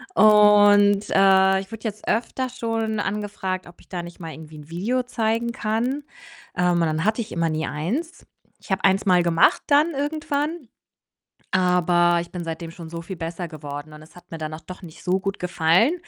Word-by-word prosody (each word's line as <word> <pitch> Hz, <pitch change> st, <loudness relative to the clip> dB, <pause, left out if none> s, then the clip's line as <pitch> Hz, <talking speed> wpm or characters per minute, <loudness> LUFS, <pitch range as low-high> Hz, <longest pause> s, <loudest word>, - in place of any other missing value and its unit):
und, 205 Hz, -1 st, +6 dB
äh, 190 Hz, 0 st, +5 dB
ich 195 Hz, +3 st, -9 dB
wurde 225 Hz, 0 st, -9 dB
jetzt 215 Hz, -1 st, -5 dB
öfter 255 Hz, +3 st, -1 dB
schon 225 Hz, -3 st, -2 dB
angefragt, 195 Hz, -3 st, -3 dB
ob 175 Hz, -, -16 dB
ich -, -, -24 dB
da 175 Hz, -2 st, -4 dB
nicht 175 Hz, +2 st, -11 dB
mal 165 Hz, -2 st, -7 dB
irgendwie 155 Hz, -1 st, -11 dB
'n 150 Hz, +1 st, -13 dB
Video 230 Hz, +10 st, -1 dB
zeigen 230 Hz, -1 st, -1 dB
kann. 245 Hz, +5 st, -2 dB, 0.5 s
Ähm, 180 Hz, 0 st, +2 dB
und 170 Hz, -, +1 dB
dann 160 Hz, +2 st, 0 dB
hatte 220 Hz, +2 st, +1 dB
ich 225 Hz, -, -8 dB
immer 165 Hz, -1 st, 0 dB
nie 155 Hz, +1 st, -2 dB
eins 240 Hz, -, -4 dB, 0.3 s
Ich -, -, -12 dB
habe 190 Hz, -, 0 dB
1 195 Hz, +2 st, +3 dB
mal 180 Hz, -2 st, +4 dB
gemacht 170 Hz, -1 st, +3 dB
dann 300 Hz, +3 st, +4 dB
irgendwann, 295 Hz, 0 st, -3 dB, 0.8 s
aber 175 Hz, -2 st, +3 dB
ich 170 Hz, -, -10 dB
bin 180 Hz, -2 st, -5 dB
seitdem 165 Hz, 0 st, -5 dB
schon 165 Hz, -1 st, -10 dB
so 170 Hz, 0 st, -6 dB
viel 190 Hz, +3 st, -7 dB
besser 165 Hz, +2 st, -5 dB
geworden 150 Hz, 0 st, -8 dB
und 150 Hz, -, -12 dB
es 160 Hz, -, -19 dB
hat 175 Hz, -, -16 dB
mir 165 Hz, -, -5 dB
dann 155 Hz, 0 st, -5 dB
auch 160 Hz, -, -8 dB
doch 185 Hz, +4 st, -10 dB
nicht 160 Hz, -2 st, -12 dB
so 185 Hz, +1 st, +1 dB
gut 195 Hz, 0 st, -4 dB
gefallen, 180 Hz, -, +2 dB
190 Hz, 200 wpm, -23 LUFS, 170-220 Hz, 0.8 s, und